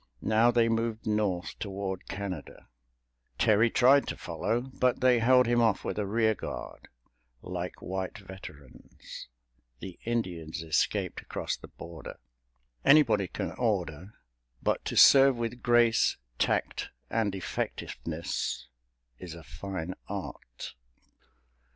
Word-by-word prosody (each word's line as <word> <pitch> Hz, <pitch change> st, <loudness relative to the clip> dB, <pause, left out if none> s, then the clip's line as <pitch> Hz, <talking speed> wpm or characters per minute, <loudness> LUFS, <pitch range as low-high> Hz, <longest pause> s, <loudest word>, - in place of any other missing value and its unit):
Now 110 Hz, +3 st, +4 dB
they 120 Hz, -1 st, +3 dB
moved 115 Hz, 0 st, -1 dB
North 105 Hz, -5 st, -1 dB
toward 95 Hz, -3 st, -4 dB
Canada. 95 Hz, -6 st, -6 dB, 0.7 s
Terry 110 Hz, +2 st, +4 dB
tried 135 Hz, +4 st, +5 dB
to -, -, -4 dB
follow, 115 Hz, +2 st, -1 dB
but 125 Hz, -1 st, 0 dB
they 125 Hz, -2 st, +4 dB
held 125 Hz, +2 st, +5 dB
him 120 Hz, 0 st, +3 dB
off 110 Hz, -4 st, +2 dB
with -, -, -2 dB
a 105 Hz, -, -1 dB
rear 110 Hz, +1 st, +2 dB
guard, -, -, -7 dB, 0.6 s
like 90 Hz, 0 st, -5 dB
white 95 Hz, 0 st, -4 dB
veterans. 95 Hz, -9 st, -11 dB, 0.5 s
The 90 Hz, +4 st, -9 dB
Indians 85 Hz, -9 st, -3 dB
escaped 80 Hz, -2 st, 0 dB
across -, -, -3 dB
the -, -, -12 dB
border. 85 Hz, -2 st, -10 dB, 0.7 s
Anybody 115 Hz, -10 st, +5 dB
can -, -, -4 dB
order, 95 Hz, -5 st, -2 dB, 0.5 s
but -, -, 0 dB
to -, -, -3 dB
serve 135 Hz, -1 st, +8 dB
with 120 Hz, +1 st, -3 dB
grace, 120 Hz, -1 st, +4 dB, 0.2 s
tact -, -, 0 dB, 0.2 s
and 110 Hz, -3 st, 0 dB
effectiveness 80 Hz, -8 st, -4 dB, 0.5 s
is 85 Hz, -3 st, -8 dB
a 85 Hz, -, -11 dB
fine 90 Hz, +5 st, -5 dB
art. -, -, -7 dB
105 Hz, 120 wpm, -29 LUFS, 90-115 Hz, 0.7 s, serve